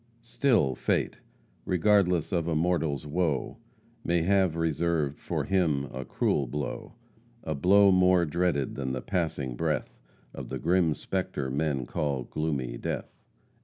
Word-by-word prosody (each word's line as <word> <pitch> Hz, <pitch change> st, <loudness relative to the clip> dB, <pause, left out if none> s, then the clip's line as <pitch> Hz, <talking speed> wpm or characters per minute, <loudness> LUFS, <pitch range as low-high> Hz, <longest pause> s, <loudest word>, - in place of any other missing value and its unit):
"Still 115 Hz, -, +2 dB
Fate, -, -, -1 dB, 0.4 s
regardless 90 Hz, -2 st, +2 dB
of 85 Hz, -3 st, 0 dB
a 80 Hz, -, 0 dB
mortal's 80 Hz, -4 st, 0 dB
woe, 75 Hz, -3 st, -1 dB, 0.5 s
May 85 Hz, -1 st, +1 dB
have 95 Hz, -2 st, +2 dB
reserved 80 Hz, -2 st, 0 dB
for -, -, -2 dB
him 80 Hz, -8 st, +1 dB
a 65 Hz, +1 st, -4 dB
cruel 70 Hz, -, 0 dB
blow 70 Hz, +2 st, -5 dB, 0.5 s
A 80 Hz, -, -2 dB
blow 100 Hz, +7 st, +5 dB
more 90 Hz, -1 st, +4 dB
dreaded 85 Hz, -3 st, 0 dB
than 65 Hz, -1 st, -3 dB
the 65 Hz, -, -3 dB
passing 80 Hz, -9 st, -2 dB
breath, -, -, -2 dB, 0.3 s
Of -, -, -7 dB
the -, -, -3 dB
grim 85 Hz, -3 st, +2 dB
spectre 75 Hz, -8 st, -3 dB
men 70 Hz, -2 st, -1 dB
call 70 Hz, -1 st, -2 dB
gloomy 70 Hz, -5 st, -3 dB
death." -, -, -4 dB
80 Hz, 135 wpm, -28 LUFS, 70-90 Hz, 0.5 s, blow